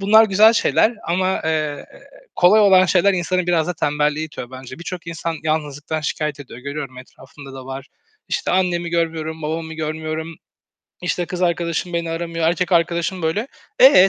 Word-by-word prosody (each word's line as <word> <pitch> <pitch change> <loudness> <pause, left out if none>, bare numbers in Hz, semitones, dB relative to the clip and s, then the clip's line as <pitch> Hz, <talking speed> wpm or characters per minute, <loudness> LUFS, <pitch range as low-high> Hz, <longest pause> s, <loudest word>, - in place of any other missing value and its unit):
bunlar 220 +3 +6
güzel 215 +2 +6
şeyler 230 +1 +3
ama, 185 +2 0
eee, 155 -2 -1 0.5
kolay 190 +5 +6
olan 190 -2 +6
şeyler 195 +2 +4
insanı 180 0 0
biraz 165 -3 +2
da 180 - -2
tembelliğe 150 +1 0
itiyor 125 -5 -8
bence. 130 +1 -9
Birçok 170 0 -7
insan 165 0 -3
yalnızlıktan 155 0 -2
şikâyet 150 -1 -3
ediyor, 125 -4 -10
görüyorum 140 -2 -6
etrafımda 135 +1 -13
da 130 -1 -9
var. 135 +1 -7 0.4
İşte, 475 - -1
"Annemi 175 -2 +1
görmüyorum, 160 -1 -2
babamı 160 +1 -3
görmüyorum, 160 +1 -4 0.7
işte, 180 -1 -1
kız 180 0 -4
arkadaşım 170 0 0
beni 170 -1 -2
aramıyor, 165 0 -1
erkek 180 +1 0
arkadaşım 170 +1 +1
böyle." 205 +11 -1 0.3
Eee, 225 -8 +8
165 Hz, 160 wpm, -20 LUFS, 155-180 Hz, 0.7 s, Eee